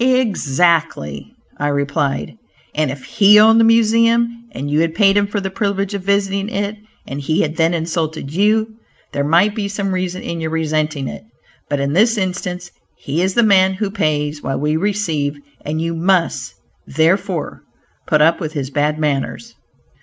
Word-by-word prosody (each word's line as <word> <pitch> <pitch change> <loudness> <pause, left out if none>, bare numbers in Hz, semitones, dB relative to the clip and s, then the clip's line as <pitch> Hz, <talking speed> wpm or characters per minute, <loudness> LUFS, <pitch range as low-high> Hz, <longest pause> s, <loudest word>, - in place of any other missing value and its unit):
"Exactly," 165 - +1 0.3
I 145 - 0
replied, 140 -1 -1 0.4
"and 155 -1 0
if 135 -1 -7
he 210 +1 +5
owned 225 +1 +6
the - - +5
Museum, 230 +1 +3
and 140 - -5
you 145 +1 +1
had 165 0 0
paid 200 -2 +4
him 205 0 +2
for 205 0 -2
the 190 -1 -4
privilege 200 -1 -2
of 200 - -3
visiting 200 +1 0
it, 205 -1 -2 0.3
and 140 +1 -5
he 155 +3 0
had 155 +1 -2
then 165 +1 +2
insulted 160 -3 -3
you, 215 +4 +2 0.4
there 140 - -1
might 170 +8 +3
be 210 -2 -3
some 200 -1 -3
reason 185 0 -3
in 170 -1 -4
your 160 - -2
resenting 155 -3 -1
it, - - -7 0.5
but 145 - -1
in 140 +1 -1
this 225 +6 +3
instance 180 -2 -3 0.3
he 150 +5 -2
is 190 +1 0
the 235 - +4
man 190 -3 +4
who 200 0 -3
pays, 150 -6 -1
while 135 - -3
we 150 +2 0
receive, 160 -6 -1 0.3
and 155 +2 -3
you 165 +1 -2
must, 175 +1 0 0.3
therefore, 180 +2 0 0.5
put 150 0 +3
up 165 +2 +3
with 155 -2 -5
his 140 -3 -4
bad 150 +2 0
manners." 150 +10 -2
175 Hz, 175 wpm, -18 LUFS, 150-205 Hz, 0.5 s, owned